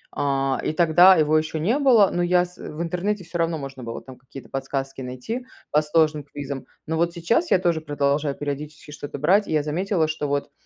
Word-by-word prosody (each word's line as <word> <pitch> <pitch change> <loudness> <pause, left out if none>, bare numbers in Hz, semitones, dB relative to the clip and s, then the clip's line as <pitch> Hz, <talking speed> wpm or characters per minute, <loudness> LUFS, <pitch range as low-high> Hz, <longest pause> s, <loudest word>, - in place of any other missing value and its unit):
А 135 -1 0
и - - 0
тогда 175 +3 +6
его 155 -2 +2
еще 155 0 0
не 220 - +1
было, 235 -9 +5
но 175 - -1
я 180 0 +3
с 180 0 -16
в 150 - -8
интернете 185 +4 -2
всё 175 0 -6
равно 165 -1 0
можно 135 -2 -8
было 115 0 -6
там 130 -1 -12
какие-то 135 +1 -12
подсказки 135 0 -4
найти 130 - -5 0.2
по 150 - +4
сложным 155 -1 +1
квизам. 140 -1 -7 0.2
Но 160 +1 -2
вот 170 +1 +1
сейчас 230 - 0
я - - +5
тоже 170 -3 0
продолжаю 145 -1 0
периодически 145 +1 -6
что-то 145 -1 -7
брать. 185 +9 +3
И - - -6
я 155 -2 +2
заметила, 165 +2 0
что 155 -1 -3
вот 140 0 -2
155 Hz, 210 wpm, -23 LUFS, 140-175 Hz, 0.2 s, тогда